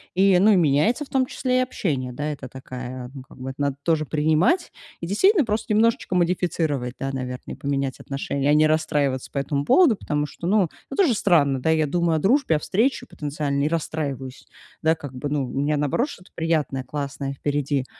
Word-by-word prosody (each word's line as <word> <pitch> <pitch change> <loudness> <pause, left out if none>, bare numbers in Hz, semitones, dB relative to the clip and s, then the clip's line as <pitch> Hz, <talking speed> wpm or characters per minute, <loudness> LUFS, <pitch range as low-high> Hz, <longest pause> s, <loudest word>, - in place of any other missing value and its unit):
И, 190 -1 +5
ну 210 +4 +5
и - - +5
меняется 170 - +2
в - - -22
том 260 -1 +2
числе 255 0 -1
и - - +4
общение, 145 - -2
да? 145 +5 -3
Это 135 -3 -9
такая, 125 -1 -7
ну 135 - -8
как 130 - -16
бы, 130 +1 -6
это 130 - -8
надо 140 -1 0
тоже 160 -1 +1
принимать 155 - +1 0.3
и 170 - -5
действительно 330 - +4
просто 215 0 -1
немножечко 225 -2 +2
модифицировать, 165 -7 0
да, 135 0 -2
наверно. 125 -1 -5
И - - -8
поменять 140 -1 -2
отношение, 140 0 -2
а - - +5
не 155 +1 +5
расстраиваться 145 -4 0
по - - -6
этому 140 0 -1
поводу, 295 - +5
потому 150 -6 -2
что, 170 +3 -7
ну, 195 -1 +3 0.3
тоже 360 -11 +4
странно, 140 -10 +3
да? 160 - 0
Я 160 -1 +2
думаю 170 +2 +1
о - - 0
дружбе, 215 - +3
о - - -4
встрече 225 - 0
потенциальной 145 -1 -2
и - - 0
расстраиваюсь. 140 -5 -4 0.4
Да 160 +1 +3
как 145 -4 -9
бы, 135 +3 -4
ну, 145 -2 0
у 135 +2 -3
меня 150 +1 +1
наоборот 150 - 0
что-то 180 -9 -13
приятное, 155 -5 -1
классное 140 +1 -4
впереди, 140 -1 -1
150 Hz, 205 wpm, -23 LUFS, 140-180 Hz, 0.4 s, И